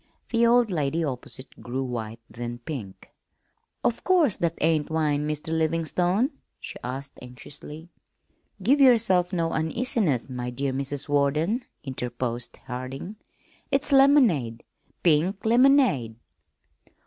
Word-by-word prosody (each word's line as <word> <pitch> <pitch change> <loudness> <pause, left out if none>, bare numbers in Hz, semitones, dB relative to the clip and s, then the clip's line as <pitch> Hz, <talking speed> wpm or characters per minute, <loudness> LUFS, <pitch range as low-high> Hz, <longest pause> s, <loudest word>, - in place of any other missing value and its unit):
The 235 0 +3
old 240 -2 +4
lady 160 0 0
opposite 130 -1 -6
grew 130 +2 -3
white, 115 -3 -5
then 120 +1 -6
pink. 120 -7 -8 0.7
"Of 235 - 0
course 340 - +3
that 170 -1 -1
ain't 155 -1 +1
wine, 150 -2 0
Mr. 155 +2 -3
Livingstone?" 175 - +1 0.3
she - - -7
asked 135 +3 -6
anxiously. 150 +6 -11 0.7
"Give 275 +7 +3
yourself 215 -9 +4
no 170 -3 -1
uneasiness, 160 - 0
my 125 -2 -5
dear 135 +2 -2
Mrs. 140 +2 -3
Warden," 150 - +1 0.2
interposed 125 -2 -4
Harding. 130 +11 -6 0.5
"It's 275 +1 +1
lemonade 245 - +4 0.4
pink 180 +5 +2
lemonade." 240 - +4
155 Hz, 110 wpm, -25 LUFS, 130-210 Hz, 0.7 s, old